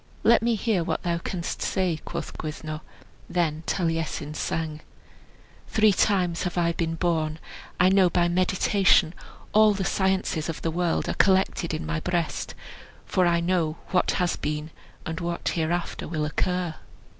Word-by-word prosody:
"Let 235 - +5
me 235 0 +2
hear 210 -4 +1
what - - -2
thou 170 -1 0
canst 170 0 -4
say," 185 -4 0
quoth - - -5
Gwyddno. 155 0 -5 0.5
Then 160 -3 0
Taliesin 165 -3 -1
sang: 155 0 -3 0.9
"Three 215 -2 +4
times 180 -4 +2
have 180 0 -3
I 170 -1 +3
been 165 -1 -2
born, 160 -2 0 0.4
I 180 - +6
know 190 -1 +5
by 175 0 +2
meditation; 185 -1 +3 0.4
All 215 -1 +6
the 190 -1 -2
sciences 190 -4 0
of 165 - -5
the 165 - 0
world 170 0 0
are - - 0
collected 190 -3 +2
in 155 0 -3
my 165 0 -1
breast, 170 -1 -2 0.5
For 185 -1 +2
I 170 0 +2
know 170 -3 0
what 180 - +2
has 180 -1 0
been, 150 +1 -3 0.3
and 160 0 -4
what 170 0 -2
hereafter 170 +1 -2
will 155 -2 -2
occur." 180 +2 -1
170 Hz, 155 wpm, -26 LUFS, 160-185 Hz, 0.9 s, I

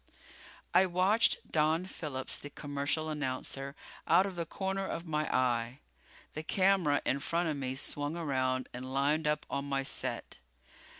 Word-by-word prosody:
I 185 +2 +6
watched 185 +5 +2
Don 160 +3 +2
Phillips, 145 -8 -3
the 145 - -7
commercial 145 +2 -2
announcer, 140 -1 -3 0.3
out 190 - +6
of 195 -2 -4
the 170 -1 -3
corner 190 +2 -2
of 170 -2 -4
my 155 -2 -1
eye. 120 -1 +1 0.6
The 155 - -4
camera 185 -4 +3
in 140 - +1
front 170 +3 0
of 155 - -1
me 130 -1 -3
swung 145 +3 0
around 130 -5 0
and 130 +1 -6
lined 145 +3 +2
up 150 0 +1
on 140 0 -2
my 135 -1 +1
set. - - -3
150 Hz, 155 wpm, -32 LUFS, 135-170 Hz, 0.6 s, I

